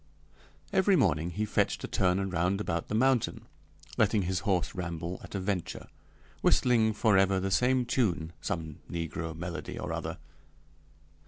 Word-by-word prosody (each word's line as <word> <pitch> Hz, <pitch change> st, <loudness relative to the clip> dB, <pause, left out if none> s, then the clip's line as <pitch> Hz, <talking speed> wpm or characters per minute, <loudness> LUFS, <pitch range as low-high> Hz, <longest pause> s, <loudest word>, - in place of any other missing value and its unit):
Every 190 Hz, +1 st, +4 dB
morning 85 Hz, -, +2 dB
he 105 Hz, +5 st, -2 dB
fetched -, -, 0 dB
a -, -, -2 dB
turn 95 Hz, +1 st, +1 dB
round 90 Hz, +3 st, +1 dB
about 85 Hz, -5 st, -2 dB
the 105 Hz, -, -2 dB
mountain, 130 Hz, 0 st, +2 dB, 0.5 s
letting 105 Hz, -1 st, +3 dB
his 90 Hz, 0 st, -1 dB
horse 95 Hz, -4 st, 0 dB
ramble 85 Hz, -1 st, -4 dB
at -, -, -9 dB
a -, -, 0 dB
venture, 95 Hz, -2 st, -3 dB, 0.5 s
whistling 115 Hz, -3 st, +3 dB
forever 95 Hz, -3 st, +3 dB
the 95 Hz, +1 st, -2 dB
same 125 Hz, +4 st, +3 dB
tune, 90 Hz, -10 st, 0 dB
some 80 Hz, -3 st, -4 dB
negro 80 Hz, -1 st, -4 dB
melody 85 Hz, +1 st, -5 dB
or -, -, -4 dB
other. -, -, -4 dB
95 Hz, 145 wpm, -30 LUFS, 85-110 Hz, 0.5 s, Every